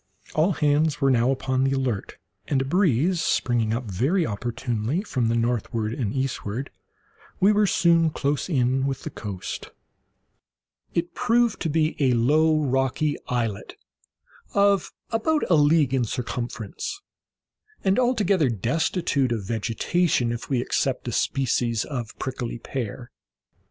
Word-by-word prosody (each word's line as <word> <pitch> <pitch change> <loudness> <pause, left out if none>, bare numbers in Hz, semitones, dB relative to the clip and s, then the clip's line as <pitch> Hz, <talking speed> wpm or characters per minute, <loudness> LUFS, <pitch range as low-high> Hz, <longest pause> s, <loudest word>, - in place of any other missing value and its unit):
All 165 +5 +2
hands 150 0 +2
were 135 -2 +3
now 120 0 +3
upon 130 -1 0
the 135 0 +2
alert, 130 -7 -2 0.3
and, 140 - +1
a 135 - -1
breeze 170 - +2
springing 115 -7 +1
up 115 +3 -1
very 130 - 0
opportunely 120 - -2
from 130 - -1
the 115 - +1
northward 115 -1 -1
and 115 -5 -2
eastward, 130 -1 -3 0.7
we 195 +3 +5
were 210 0 +3
soon 170 -3 +4
close 145 +2 -1
in 130 -2 +1
with 135 -1 -3
the 155 - -5
coast. 100 -7 -6 1.3
It 170 0 -1
proved 240 -2 +2
to 165 - 0
be 155 +1 +1
a 130 -4 +3
low 155 +6 +3
rocky 135 +2 +1
islet, 115 -5 -2 0.8
of 200 -2 +3 0.2
about 300 +8 +1
a - - +7
league 150 -2 +4
in 130 -2 +2
circumference, 120 - -4 0.8
and 195 +4 +3
altogether 205 - +2
destitute 135 - 0
of 110 -4 -1
vegetation, 120 - 0
if 120 0 -5
we 130 -3 +1
except 130 0 -1
a - - -1
species 120 -4 0
of 120 -6 -5
prickly 125 -3 -4
pear. 120 0 -5
135 Hz, 135 wpm, -24 LUFS, 120-160 Hz, 1.3 s, a